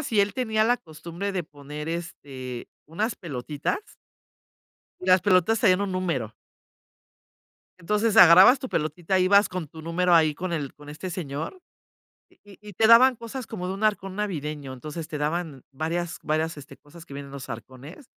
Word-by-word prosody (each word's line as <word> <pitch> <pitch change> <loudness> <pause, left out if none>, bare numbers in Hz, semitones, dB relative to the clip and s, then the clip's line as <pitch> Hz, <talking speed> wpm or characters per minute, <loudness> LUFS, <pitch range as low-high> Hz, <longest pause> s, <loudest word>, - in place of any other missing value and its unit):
y - - -4
si 215 -3 +2
él 200 0 +1
tenía 220 -4 +1
la 245 +2 +3
costumbre 170 +3 -7
de 185 -2 -2
poner, 150 0 -9
este, 135 -7 -6 0.2
unas 210 +9 -2
pelotitas. 145 - -3 1.2
Y 185 - -8
las 185 -1 +6
pelotas 205 +3 +3
traían 185 -4 +4
un 200 -2 -2
número. 140 - -2 1.5
Entonces, 210 +5 0
agarrabas 185 +10 +9
tu 260 -1 -6
pelotita, 165 +4 -1
ibas 200 +3 +5
con 180 -5 -5
tu 160 +1 -11
número 175 +2 0
ahí 155 -3 +5
con 180 +2 -4
el 145 -5 -3
con 145 0 -15
este 150 +5 -6
señor, 160 - -5 0.7
y 200 -2 -18
y 210 0 -10
te 220 +5 +3
daban 245 +1 +7
cosas 235 +2 -7
como 180 -5 -5
de 190 - -2
un 200 +3 -6
arcón 195 -3 0
navideño, 150 -9 -4
entonces 150 +5 -7
te 150 - -4
daban 150 -2 -3
varias 165 +3 -3
varias 160 +1 -1
este 145 -1 -12
cosas 165 +3 -15
que 140 - -12
viene 140 0 -7
en 135 - -13
los 135 -2 -8
arcones 130 - -10
170 Hz, 175 wpm, -25 LUFS, 150-200 Hz, 1.5 s, agarrabas